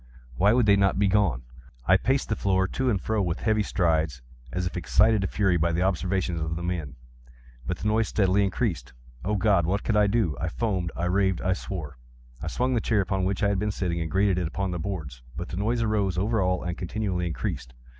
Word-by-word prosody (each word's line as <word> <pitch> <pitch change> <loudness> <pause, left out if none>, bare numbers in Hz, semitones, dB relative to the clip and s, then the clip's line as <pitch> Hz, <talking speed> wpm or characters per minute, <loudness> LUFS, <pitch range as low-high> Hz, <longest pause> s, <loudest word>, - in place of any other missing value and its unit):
Why 100 +11 +4
would 120 0 +3
they 100 -1 +6
not 100 -1 +2
be 100 0 +3
gone? 95 -11 +2 0.4
I 95 - +5
paced 130 +8 +1
the 105 - +1
floor 95 -2 +1
to 130 +6 -1
and 105 -5 +1
fro 110 +2 -1
with 85 -4 -2
heavy 110 -1 +2
strides, 80 -9 0 0.3
as 90 0 -2
if 90 - -4
excited 105 +4 +3
to 95 - 0
fury 95 -3 +1
by 85 +1 +1
the 85 +2 0
observations 95 -2 0
of 80 +1 -2
the 85 - -5
men—but 60 -6 -7
the 105 - -3
noise 110 0 +2
steadily 100 -1 +2
increased. 90 - -2 0.3
Oh 105 +3 0
God! 95 -4 +2
what 100 +3 0
could 110 - 0
I 105 -1 +4
do? 100 - +1
I 80 - -1
foamed—I 90 -4 -2
raved—I 95 0 +1
swore! 80 -8 -6 0.4
I - - -5
swung 125 +1 0
the 120 - +1
chair 105 -2 +2
upon 95 0 -1
which 100 +2 -1
I 100 - +4
had 100 -2 0
been 105 +1 0
sitting, 90 -4 -2
and 80 - -3
grated 95 +1 +2
it 90 - -1
upon 95 +3 -3
the 90 - -3
boards, 80 -10 -5 0.2
but 85 - -5
the 85 - -5
noise 115 +4 0
arose 100 -4 0
over 110 +3 +1
all 90 0 0
and 90 0 -3
continually 90 0 -2
increased. 65 -4 -4
95 Hz, 220 wpm, -26 LUFS, 85-105 Hz, 0.4 s, they